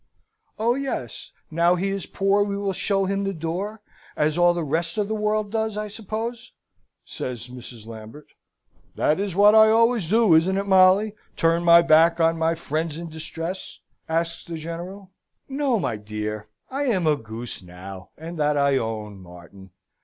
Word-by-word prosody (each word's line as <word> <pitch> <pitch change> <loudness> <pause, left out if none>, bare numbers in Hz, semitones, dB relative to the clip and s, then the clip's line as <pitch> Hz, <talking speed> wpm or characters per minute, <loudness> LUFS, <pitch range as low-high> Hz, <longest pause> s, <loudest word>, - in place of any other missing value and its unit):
"Oh 230 +2 +2
yes: 275 +1 -4 0.2
now 170 +2 +3
he 190 +2 -1
is 195 -1 -3
poor 195 +1 +1
we 200 -1 -3
will 200 -1 -1
show 195 +1 0
him 195 +1 -1
the 195 -1 -2
door, 185 +7 -4 0.3
as 150 0 +1
all 175 0 +4
the 170 - -2
rest 165 +7 -2
of 210 -1 0
the 220 - -2
world 210 -1 -1
does, 220 -1 -1
I 210 0 -3
suppose," 225 +3 -6 0.5
says 125 -1 -6
Mrs. 120 -3 -11
Lambert. 115 +6 -11 0.7
"That 155 - +1
is 200 -3 -2
what 205 +2 +6
I 220 0 +7
always 230 -5 +3
do, 220 -3 +4
isn't 175 +4 +4
it, 200 - -1
Molly? 190 +2 +5 0.2
turn 165 -1 +2
my 170 0 +7
back 165 +1 +5
on 165 0 +3
my 165 +1 +1
friends 160 0 -3
in 170 0 -6
distress?" 165 +3 -6 0.3
asks 165 +1 -1
the 170 -1 -6
General. 175 +4 -7 0.4
"No, 270 -4 0
my 120 - -2
dear! 105 0 -5 0.2
I 280 +2 -1
am 195 -10 +1
a 155 -1 +4
goose, 115 -2 -8
now, 95 +1 -10
and 165 +1 -8
that 150 0 +2
I 140 -1 +3
own, 110 -4 -4
Martin!" 90 +2 -14
170 Hz, 175 wpm, -24 LUFS, 150-205 Hz, 0.7 s, I